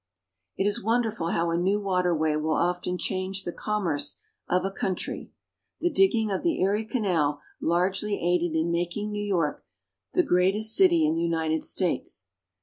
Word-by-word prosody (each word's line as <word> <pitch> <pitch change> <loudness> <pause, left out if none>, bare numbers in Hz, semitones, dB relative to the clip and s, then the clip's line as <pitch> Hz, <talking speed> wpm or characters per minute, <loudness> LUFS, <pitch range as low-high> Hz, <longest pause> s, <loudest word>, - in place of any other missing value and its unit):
_ - - -61 0.5
It 195 - +1
is 205 -1 +1
wonderful 225 -5 0
how 170 0 0
a 165 - +1
new 190 +4 +2
waterway 180 -6 +1
will 155 0 0
often 180 +2 0
change 190 +1 -2
the 175 - -4
commerce 165 -9 -1 0.3
of 180 +1 +2
a 195 - -1
country. 190 -1 -3 0.5
The 350 - +1
digging 215 -2 +3
of 190 - -1
the 335 -2 0
Erie 205 +4 +1
Canal 175 - 0 0.2
largely 190 +4 +1
aided 175 -1 +1
in 160 +1 +1
making 175 +5 -2
New 205 0 -3
York 175 -7 -1 0.5
the 360 - +4
greatest 210 - +2
city 170 -5 +5
in 155 - +2
the 165 - -1
United 160 -2 0
States. 170 - -1
180 Hz, 165 wpm, -26 LUFS, 165-205 Hz, 0.5 s, city